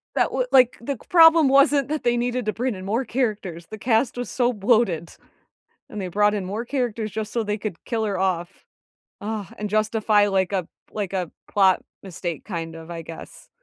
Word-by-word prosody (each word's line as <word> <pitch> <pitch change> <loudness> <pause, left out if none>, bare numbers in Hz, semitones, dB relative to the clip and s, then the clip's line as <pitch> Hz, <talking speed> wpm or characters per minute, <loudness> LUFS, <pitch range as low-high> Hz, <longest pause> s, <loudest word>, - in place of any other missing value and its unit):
That - - +2
would - - -1
like, 250 -2 +5
the 255 +4 -3
g - - -18
problem 325 -3 +7
wasn't 275 0 +4
that 300 -2 -3
they 240 0 +2
needed 245 -1 -1
to 215 - -1
bring 250 -1 -2
in 185 0 -8
more 230 +6 0
characters. 210 -9 -2
The 215 - -8
cast 235 +2 +1
was 245 - -4
so 245 -1 +1
bloated, 205 -6 +1 0.8
and 210 - -6
they 185 - -3
brought 205 +3 +2
in 200 -3 -2
more 210 +5 -4
characters 235 -5 -2
just 215 +1 -5
so 235 - 0
they 210 -1 -2
could 200 -5 -6
kill 225 -2 -1
her 200 -3 -1
off, 180 -2 -2 0.6
uh, 210 -1 -4
and 210 -1 -4
justify 215 -1 +2
like 190 -1 0
a 185 -4 -1 0.2
like 205 -3 -4
a 180 -4 -2 0.2
plot 190 -2 +4 0.2
mistake 175 -4 -5
kind 165 -4 -5
of, 165 +1 -10
I 165 -1 -5
guess. 165 0 -11
215 Hz, 205 wpm, -23 LUFS, 190-245 Hz, 0.8 s, problem